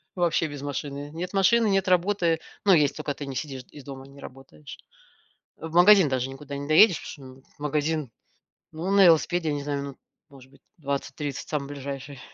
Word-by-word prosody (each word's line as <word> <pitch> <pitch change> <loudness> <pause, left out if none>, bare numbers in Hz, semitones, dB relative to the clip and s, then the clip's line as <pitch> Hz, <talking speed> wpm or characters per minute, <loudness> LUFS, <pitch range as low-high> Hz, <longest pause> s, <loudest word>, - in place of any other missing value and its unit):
вообще 170 -2 +1
без 145 -2 -8
машины. 145 0 -5
Нет 180 +4 -5
машины, 215 +4 +3
нет 195 -2 +1
работы, 180 -2 +2 0.3
но 195 - +6
если 150 -4 +3
только 150 -1 -3
ты 145 - -7
не 135 -1 -7
сидишь, 135 -3 -5
из 145 - -12
дома, 135 -2 -9
не 140 +1 -16
работаешь. 125 - -12 0.8
В 160 +1 -8
магазин 180 -2 +7
даже 130 0 -1
никуда 140 +1 -8
не 140 0 -6
доедешь, 165 +4 +5
потому 130 -3 -13
что - - -32
магазин 150 -2 -1 0.6
ну 165 +4 -4
на 200 -1 +6
велосипеде, 165 0 +3
я 145 - -1
не 145 - -4
знаю, 140 -1 -3
ну 140 -2 -7 0.3
может 135 -2 -16
быть, 140 - -22 0.2
20-30 140 -1 -4
самый 145 -3 -2
ближайший. 140 -1 -7
145 Hz, 185 wpm, -25 LUFS, 140-170 Hz, 0.8 s, магазин